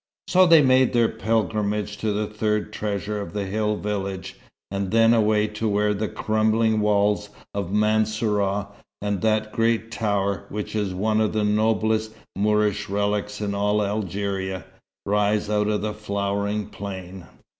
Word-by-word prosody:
So 185 Hz, 0 st, +5 dB
they 165 Hz, -3 st, +7 dB
made 130 Hz, -1 st, +4 dB
their 120 Hz, -2 st, +3 dB
pilgrimage 105 Hz, -1 st, -1 dB
to 110 Hz, 0 st, -1 dB
the 105 Hz, +1 st, -1 dB
third 105 Hz, 0 st, -2 dB
treasure 105 Hz, 0 st, -3 dB
of 95 Hz, -3 st, -7 dB
the 100 Hz, -1 st, -2 dB
hill 105 Hz, +2 st, 0 dB
village; 100 Hz, -3 st, -4 dB, 0.4 s
and 100 Hz, -1 st, -2 dB
then 115 Hz, +2 st, +5 dB
away 105 Hz, -2 st, +3 dB
to 105 Hz, +1 st, -2 dB
where 105 Hz, 0 st, +2 dB
the 105 Hz, +1 st, -2 dB
crumbling 110 Hz, +1 st, +1 dB
walls 105 Hz, 0 st, +2 dB, 0.2 s
of 100 Hz, -3 st, -3 dB
Mansourah, 105 Hz, -1 st, +1 dB, 0.3 s
and 100 Hz, -2 st, -2 dB
that 110 Hz, -1 st, +1 dB
great 115 Hz, 0 st, +1 dB
tower, 100 Hz, -3 st, -1 dB
which 105 Hz, +1 st, -5 dB
is 100 Hz, -3 st, -1 dB
one 110 Hz, +3 st, +1 dB
of 110 Hz, -, +1 dB
the 110 Hz, -1 st, +1 dB
noblest 110 Hz, +1 st, +1 dB, 0.2 s
Moorish 105 Hz, 0 st, +1 dB
relics 105 Hz, +1 st, -1 dB
in 100 Hz, -1 st, -1 dB
all 105 Hz, +1 st, +1 dB
Algeria, 100 Hz, -2 st, -3 dB, 0.4 s
rise 105 Hz, +1 st, +1 dB
out 105 Hz, 0 st, +2 dB
of 105 Hz, -1 st, 0 dB
a 105 Hz, 0 st, -2 dB
flowering 100 Hz, 0 st, -2 dB
plain. 95 Hz, -2 st, -8 dB
105 Hz, 150 wpm, -24 LUFS, 100-110 Hz, 0.4 s, they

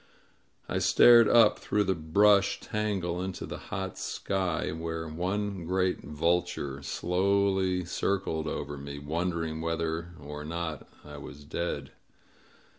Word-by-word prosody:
I -, -, -1 dB
stared 120 Hz, -2 st, +7 dB
up 115 Hz, -3 st, +6 dB
through 105 Hz, -, +1 dB
the 95 Hz, -1 st, +1 dB
brush 100 Hz, +5 st, +3 dB
tangle 95 Hz, -5 st, -2 dB
into 95 Hz, 0 st, -4 dB
the -, -, -7 dB
hot -, -, -4 dB
sky, 95 Hz, -6 st, -2 dB
where 80 Hz, 0 st, -4 dB
one 95 Hz, +4 st, -2 dB
great 90 Hz, +1 st, +1 dB
vulture 80 Hz, -2 st, -1 dB
slowly 95 Hz, +3 st, +1 dB
circled 85 Hz, -3 st, -1 dB
over 75 Hz, -1 st, -4 dB
me, 70 Hz, 0 st, -7 dB
wondering 80 Hz, +1 st, -2 dB
whether 85 Hz, +1 st, -2 dB
or 75 Hz, +1 st, -7 dB
not 80 Hz, -2 st, -5 dB, 0.2 s
I 75 Hz, 0 st, -9 dB
was 70 Hz, 0 st, -10 dB
dead. 85 Hz, +4 st, -3 dB
85 Hz, 120 wpm, -29 LUFS, 80-95 Hz, 0.2 s, stared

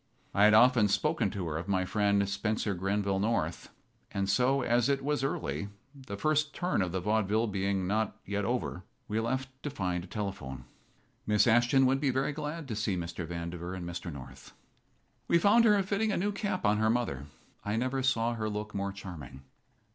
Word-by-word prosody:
I 100 Hz, -, +5 dB
had 105 Hz, 0 st, +7 dB
often 120 Hz, -1 st, +6 dB
spoken 100 Hz, -, +1 dB
to 95 Hz, -4 st, -4 dB
her 75 Hz, -1 st, -2 dB
of 85 Hz, -, -7 dB
my 95 Hz, -2 st, +1 dB
friend, 100 Hz, 0 st, +2 dB
Spencer 105 Hz, +1 st, -1 dB
Grenville 95 Hz, +1 st, 0 dB
North; 115 Hz, +3 st, -1 dB, 0.4 s
and 100 Hz, -1 st, -2 dB
so, 125 Hz, +6 st, +2 dB
as 120 Hz, +2 st, +2 dB
it 135 Hz, -1 st, +1 dB
was 145 Hz, -1 st, 0 dB
early, 80 Hz, -, -2 dB, 0.2 s
the 130 Hz, -8 st, -8 dB
first 155 Hz, +3 st, +1 dB
turn 180 Hz, -, 0 dB
of 90 Hz, -2 st, -1 dB
the 95 Hz, -, -1 dB
vaudeville 105 Hz, +3 st, +1 dB
being 100 Hz, -2 st, -1 dB
not 105 Hz, +2 st, 0 dB
yet 100 Hz, +1 st, -2 dB
over, 115 Hz, -5 st, -2 dB, 0.2 s
we 110 Hz, +1 st, -1 dB
left 130 Hz, +3 st, -1 dB
to 145 Hz, -, -3 dB
find 90 Hz, -9 st, -2 dB
a -, -, -10 dB
telephone. 90 Hz, -, -5 dB, 0.6 s
Miss 105 Hz, -1 st, +4 dB
Ashton 120 Hz, +3 st, +4 dB
would 135 Hz, +1 st, +3 dB
be 145 Hz, -, +2 dB
very 135 Hz, +3 st, 0 dB
glad 150 Hz, +1 st, -5 dB
to 110 Hz, -, -2 dB
see 105 Hz, -3 st, -1 dB
Mr. 85 Hz, 0 st, -5 dB
Vandiver 85 Hz, +1 st, -5 dB
and 90 Hz, -2 st, -6 dB
Mr. 85 Hz, 0 st, -5 dB
North. 70 Hz, -4 st, -11 dB, 0.7 s
We 170 Hz, -, +4 dB
found 205 Hz, +7 st, +5 dB
her 205 Hz, -3 st, +5 dB
fitting 205 Hz, +3 st, 0 dB
a -, -, 0 dB
new 205 Hz, +3 st, 0 dB
cap 200 Hz, -2 st, -2 dB
on 105 Hz, +1 st, +3 dB
her 110 Hz, +1 st, +2 dB
mother. 110 Hz, -, -1 dB, 0.4 s
I 105 Hz, +1 st, -1 dB
never 130 Hz, +3 st, 0 dB
saw 120 Hz, -3 st, +1 dB
her 110 Hz, -2 st, -2 dB
look 105 Hz, 0 st, -5 dB
more 100 Hz, 0 st, -2 dB
charming. 85 Hz, -9 st, -9 dB
105 Hz, 195 wpm, -30 LUFS, 95-130 Hz, 0.7 s, had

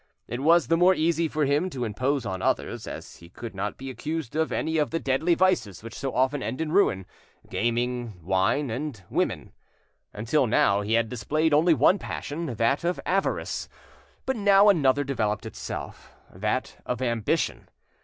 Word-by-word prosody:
It 120 Hz, -, -4 dB
was 165 Hz, +2 st, +4 dB
the 165 Hz, +7 st, +2 dB
more 180 Hz, +2 st, +5 dB
easy 165 Hz, 0 st, +1 dB
for 155 Hz, -1 st, 0 dB
him 145 Hz, +7 st, +1 dB
to 130 Hz, -7 st, -3 dB
impose 130 Hz, +5 st, -1 dB
on 95 Hz, -3 st, -3 dB
others, -, -, -1 dB
as -, -, -8 dB
he 85 Hz, -, -15 dB
could 115 Hz, +5 st, -8 dB
not 100 Hz, +2 st, -4 dB
be 135 Hz, 0 st, -6 dB
accused 150 Hz, +2 st, -5 dB
of 160 Hz, 0 st, 0 dB
any 160 Hz, 0 st, -1 dB
of 150 Hz, -, +1 dB
the 165 Hz, -, -1 dB
deadly 155 Hz, +6 st, +1 dB
vices 140 Hz, -, +1 dB
which 115 Hz, 0 st, -8 dB
so 135 Hz, 0 st, -3 dB
often 130 Hz, +2 st, +1 dB
end 125 Hz, +4 st, -4 dB
in 160 Hz, -1 st, -2 dB
ruin—gaming, 120 Hz, -, -1 dB
wine, 95 Hz, -, +1 dB
and 125 Hz, -4 st, -5 dB
women. -, -, -1 dB, 0.6 s
Until 120 Hz, +6 st, +1 dB
now 100 Hz, -2 st, +3 dB
he 105 Hz, +2 st, -2 dB
had 115 Hz, 0 st, +3 dB
displayed 145 Hz, +8 st, 0 dB
only 160 Hz, +3 st, +5 dB
one 165 Hz, +9 st, +4 dB
passion, 160 Hz, +3 st, -5 dB
that 125 Hz, +4 st, 0 dB
of 175 Hz, +1 st, 0 dB
avarice, 195 Hz, +1 st, -1 dB, 0.6 s
but 265 Hz, -, 0 dB
now 205 Hz, -1 st, +5 dB
another 145 Hz, -7 st, +3 dB
developed 110 Hz, -7 st, -1 dB
itself, -, -, -7 dB, 0.2 s
that -, -, -2 dB
of 125 Hz, -, -3 dB
ambition. 115 Hz, -4 st, -1 dB
135 Hz, 170 wpm, -26 LUFS, 115-160 Hz, 0.6 s, more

